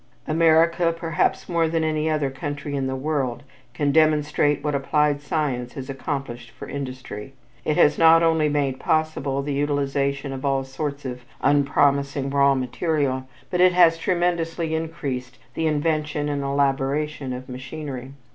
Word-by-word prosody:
America 165 +2 +4
perhaps 165 -1 -1
more 170 -2 +1
than 165 0 0
any 155 0 0
other 150 -3 0
country 145 +1 -5
in 135 -1 -1
the 130 - -2
world 135 -2 -2 0.3
can 145 -2 +1
demonstrate 150 -1 +2
what 150 -1 -1
applied 145 +1 +1
science 140 -6 -2
has 135 0 -6
accomplished 135 -4 -5
for - - -10
industry; 130 -3 -7 0.3
it 155 - 0
has 150 - +4
not 165 0 +7
only 160 -2 +3
made 140 -3 0
possible 150 -3 0
the 145 0 -2
utilization 140 -1 -1
of 135 +1 -7
all 135 -1 +1
sorts 140 +1 -5
of 125 -1 -5 0.2
unpromising 140 -1 +2
raw 140 0 +4
material, 130 0 -1 0.2
but 180 -1 +1
it 180 0 +6
has 170 -2 +6
tremendously 170 -2 0
increased 140 -6 -4 0.2
the 160 - 0
invention 150 -1 0
and 145 -1 -1
elaboration 140 +1 0
of 125 +1 -6
machinery. 130 0 -7
145 Hz, 145 wpm, -23 LUFS, 135-155 Hz, 0.3 s, not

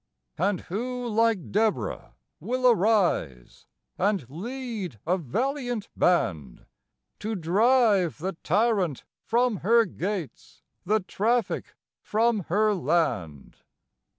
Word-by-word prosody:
And 190 +1 +1
who, 245 +6 -4
like 225 -4 +1
Deborah, 215 +1 -1 0.2
will 255 +1 0
arise 190 - +1 0.3
and 195 - 0
lead 215 - -5
a 175 +3 +2
valiant 245 - -2
band 80 - 0 0.5
To 220 +1 -3
drive 200 - +3
the 185 +5 -3
Tyrant 195 - +1 0.2
from 240 -1 +1
her 230 +5 +4
gates, 185 -3 -6 0.2
the 215 +2 +2
Traffic 225 +6 -1 0.3
from 220 -3 +1
her 210 +4 +2
land? 140 - -1
205 Hz, 95 wpm, -26 LUFS, 175-230 Hz, 0.5 s, her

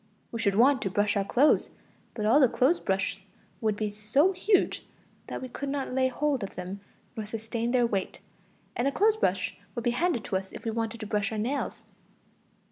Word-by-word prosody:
We 230 - -4
should 200 -3 +1
want 260 +4 +5
to 195 - -1
brush 205 +2 +1
our 200 - +2
clothes, 260 +9 +3 0.5
but 215 - -2
all 230 +7 +5
the 265 - +7
clothes 280 +10 +3
brushes 195 0 -1 0.4
would 215 -2 +1
be 210 0 -2
so 215 - +2
huge 385 +2 +1 0.4
that - - -5
we - - -4
could 275 +3 -5
not 275 -2 -2
lay 260 0 +3
hold 275 +1 0
of 200 - -6
them 185 +2 -6 0.4
nor 220 - -3
sustain 225 +2 -3
their 245 -1 +3
weight; 195 -5 -2 0.6
and 245 - +1
a - - +2
clothes 430 +7 +3
brush 185 - 0 0.2
would 235 - -3
be 240 - +2
handed 300 - 0
to 190 - -1
us 190 0 -7
if - - -9
we 225 - 0
wanted 225 0 -3
to - - -4
brush 210 0 -1
our 220 - -3
nails. 255 +7 -2
230 Hz, 210 wpm, -28 LUFS, 205-270 Hz, 0.6 s, the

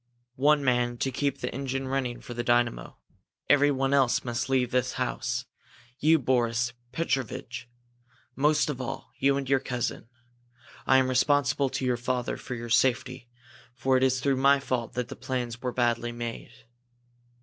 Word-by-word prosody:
"One 145 +1 +4
man, 120 -1 +1
to 135 - -1
keep 140 +1 -2
the - - -3
engine 135 0 -3
running 130 -2 -2
for 120 - -8
the 120 0 -3
dynamo. 120 -1 0 0.5
Everyone 140 -1 +3
else 135 -3 +3
must 120 +1 -3
leave 130 -2 +1
this 125 0 0
house. 125 -1 -2 0.5
You, 160 +2 +5
Boris 120 -3 +1 0.2
Petrovitch, 130 -5 -3 0.7
most 150 +2 +3
of 130 -3 -6
all 125 - -6
you 135 +1 +3
and 140 -1 -3
your 135 0 +3
cousin. 125 -2 -4 0.8
I 130 - +6
am 130 -1 +3
responsible 140 +1 +2
to 130 - -3
your 125 -1 +1
father 125 0 -2
for 125 - -6
your 120 0 -6
safety 130 0 +1 0.5
for 130 0 +1
it 130 - +3
is 130 -1 +2
through 135 0 +1
my 140 +1 +5
fault 125 -4 -3
that 125 -1 -3
the - - -7
plans 125 -2 -4
were 125 - -2
badly 120 -1 0
made." 120 +1 -7
130 Hz, 160 wpm, -27 LUFS, 120-135 Hz, 0.8 s, I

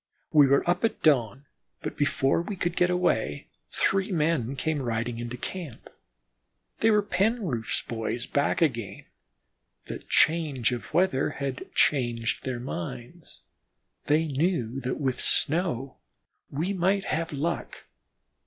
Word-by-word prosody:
We 145 -3 +7
were 140 +4 +3
up 175 - +1
at 225 - 0
dawn, 135 -3 +2 0.4
but - - -4
before 140 +1 +2
we 200 +4 -5
could 175 -2 -2
get 180 - +3
away, 175 - 0 0.2
three 195 +1 +1
men 150 -7 +1
came 155 +1 -1
riding 115 -1 -2
into 120 +1 -5
camp. 165 -2 -7 0.9
They 225 - +4
were 210 -1 +5
the - - -21
Penroof 195 - 0
boys 115 +1 -2
back 145 +3 +1
again. 115 -9 -2 0.8
The - - -6
change 155 -7 +2
of 120 -1 -5
weather 175 -7 +2
had 135 -1 -4
changed 120 -5 +1
their 130 -2 -2
minds; 120 - -7 0.7
they 155 +2 +3
knew 135 -5 0
that 125 -1 -3
with 130 -3 -1
snow 150 -5 0 0.5
we 165 +8 -2
might 190 +2 +1
have 165 +1 -1
luck. 155 +4 -3
145 Hz, 135 wpm, -27 LUFS, 120-175 Hz, 0.9 s, We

